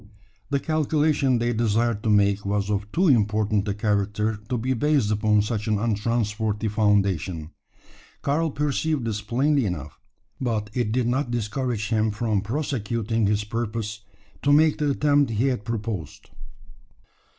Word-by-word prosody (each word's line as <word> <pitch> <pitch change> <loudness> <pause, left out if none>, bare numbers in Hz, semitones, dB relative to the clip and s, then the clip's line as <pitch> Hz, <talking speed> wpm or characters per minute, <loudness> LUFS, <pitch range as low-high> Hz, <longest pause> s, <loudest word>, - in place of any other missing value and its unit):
The 140 -1 +1
calculation 150 -3 +1
they 120 +1 0
desired 115 0 +1
to 110 - -1
make 100 -1 +3
was 100 0 -1
of 105 0 -2
too 180 - +2
important 105 -4 +2
a 100 - -1
character 105 0 0
to 125 - 0
be 130 +3 0
based 135 -3 +1
upon 105 0 +2
such 105 0 -3
an 110 -1 +2
untrustworthy 110 0 -1
foundation. 100 -6 +1 0.7
Karl 160 +3 +1
perceived 150 -1 -1
this 105 -2 -2
plainly 130 +4 +1
enough; 90 -4 -6 0.4
but 110 -5 -2
it 120 -4 -1
did 125 0 +1
not 130 +1 0
discourage 120 -1 -2
him 110 -1 +2
from 105 -1 -1
prosecuting 115 -3 -1
his 105 0 +1
purpose 110 -1 -4 0.4
to 145 - +2
make 155 +2 +4
the 150 -1 +1
attempt 145 -1 +2
he 115 +3 0
had 125 -6 -2
proposed. 105 -5 -5
110 Hz, 145 wpm, -24 LUFS, 105-130 Hz, 0.7 s, make